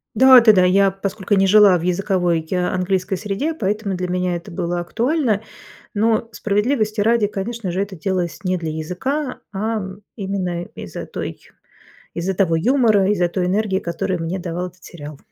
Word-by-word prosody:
Да-да-да. 235 Hz, -6 st, +7 dB
Я, 195 Hz, +1 st, +4 dB
поскольку 195 Hz, +1 st, -2 dB
не 195 Hz, 0 st, +3 dB
жила 200 Hz, -2 st, +6 dB
в 165 Hz, -, -6 dB
языковой 180 Hz, -2 st, 0 dB
я 180 Hz, -1 st, 0 dB
английской 185 Hz, +1 st, -1 dB
среде, 210 Hz, -, -2 dB
поэтому 205 Hz, -5 st, -2 dB
для 180 Hz, 0 st, -3 dB
меня 180 Hz, 0 st, -1 dB
это 170 Hz, 0 st, -8 dB
было 175 Hz, 0 st, -2 dB
актуально. 230 Hz, -, 0 dB, 0.5 s
Но, 220 Hz, +1 st, +1 dB
справедливости 215 Hz, +1 st, 0 dB
ради, 225 Hz, -1 st, +3 dB
конечно 205 Hz, -1 st, -4 dB
же, 190 Hz, +3 st, -1 dB
это 200 Hz, -1 st, -4 dB
делалось 175 Hz, +1 st, -3 dB
не 185 Hz, 0 st, 0 dB
для 160 Hz, -2 st, -4 dB
языка, 255 Hz, -, -3 dB
ам, 200 Hz, -2 st, -3 dB, 0.2 s
именно 190 Hz, -4 st, -3 dB
из-за -, -, -7 dB
той 85 Hz, 0 st, -6 dB, 0.8 s
из-за 185 Hz, +3 st, -2 dB
того 175 Hz, -4 st, +2 dB
юмора, 215 Hz, -2 st, +3 dB
из-за 180 Hz, -4 st, +2 dB
той 180 Hz, +1 st, -1 dB
энергии, 195 Hz, 0 st, 0 dB
которую 175 Hz, 0 st, -3 dB
мне 170 Hz, +4 st, -3 dB
давал 175 Hz, 0 st, -4 dB
этот 180 Hz, +1 st, -21 dB
сериал. 150 Hz, -4 st, -10 dB
190 Hz, 160 wpm, -20 LUFS, 180-215 Hz, 0.8 s, Да-да-да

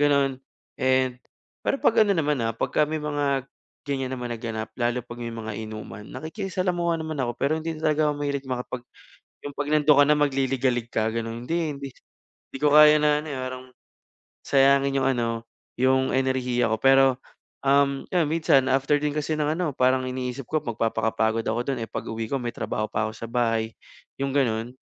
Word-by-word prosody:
gano'n 140 Hz, -2 st, +2 dB, 0.4 s
and 130 Hz, -1 st, +2 dB, 0.4 s
pero -, -, 0 dB
'pag 230 Hz, -, +3 dB
ano 200 Hz, -3 st, +2 dB
naman, 150 Hz, -4 st, +1 dB
ah, 115 Hz, -1 st, -1 dB
pagka 150 Hz, +5 st, +1 dB
may 155 Hz, -, -2 dB
mga 145 Hz, -3 st, 0 dB, 0.4 s
ganiyan 135 Hz, -2 st, -2 dB
naman 120 Hz, -1 st, -4 dB
na 115 Hz, -, -5 dB
ganap 110 Hz, -2 st, -4 dB
lalo 120 Hz, +1 st, 0 dB
'pag 120 Hz, 0 st, -10 dB
may 115 Hz, -1 st, -5 dB
mga 110 Hz, -1 st, -5 dB
inuman 110 Hz, -1 st, -8 dB
nakikisalamuha 175 Hz, +2 st, -2 dB
naman 155 Hz, -2 st, -4 dB
ako, 120 Hz, -2 st, -1 dB
pero 140 Hz, +4 st, 0 dB
hindi 165 Hz, 0 st, -4 dB
lang 155 Hz, -, -10 dB
talaga 155 Hz, 0 st, +3 dB
ako -, -, +1 dB
mahilig 140 Hz, -1 st, -2 dB
makipag 125 Hz, 0 st, -4 dB, 0.6 s
'yung 145 Hz, -1 st, -6 dB
'pag 145 Hz, 0 st, -3 dB
nandun 150 Hz, -1 st, +5 dB
ka 145 Hz, -, +7 dB
na 150 Hz, -, +5 dB
magliligalig 130 Hz, -4 st, +1 dB
ka 110 Hz, 0 st, 0 dB
gano'n, 115 Hz, +1 st, -4 dB
hindi 165 Hz, -3 st, -1 dB
hindi 140 Hz, 0 st, -6 dB, 0.6 s
hindi -, -, -7 dB
ko 150 Hz, -1 st, +4 dB
kaya 150 Hz, 0 st, +8 dB
na 150 Hz, 0 st, +4 dB
ano, 155 Hz, -, -9 dB
eh, 135 Hz, -, -4 dB
parang 130 Hz, 0 st, -5 dB, 0.8 s
sayangin 140 Hz, 0 st, +3 dB
'yung 135 Hz, -, +2 dB
ano 120 Hz, -2 st, 0 dB, 0.5 s
'yung 130 Hz, +1 st, +3 dB
enerhiya 130 Hz, -2 st, +1 dB
ko 110 Hz, -, -1 dB
pero, 135 Hz, 0 st, +6 dB, 0.6 s
um, 140 Hz, 0 st, +3 dB
ayun 175 Hz, -3 st, +2 dB
minsan 155 Hz, -5 st, +4 dB
after 135 Hz, +2 st, +2 dB
din 150 Hz, 0 st, -1 dB
kasi 155 Hz, +1 st, -1 dB
ng 150 Hz, 0 st, +1 dB
ano 175 Hz, -3 st, -1 dB
parang 130 Hz, 0 st, +2 dB
iniisip 125 Hz, 0 st, -4 dB
ko 155 Hz, -, +1 dB
magpapakapagod 115 Hz, -1 st, 0 dB
ako 115 Hz, +2 st, 0 dB
dun, 135 Hz, -3 st, 0 dB
eh, -, -, -9 dB
pag-uwi 115 Hz, 0 st, -4 dB
ko 135 Hz, -, 0 dB
may 120 Hz, -, -2 dB
trabaho 110 Hz, 0 st, -3 dB
pa 110 Hz, +1 st, 0 dB
ako -, -, -7 dB
sa 115 Hz, +1 st, -7 dB
bahay, 115 Hz, -2 st, 0 dB, 0.5 s
'yung 140 Hz, 0 st, -1 dB
ganun. 120 Hz, -3 st, 0 dB
135 Hz, 190 wpm, -25 LUFS, 120-150 Hz, 0.8 s, kaya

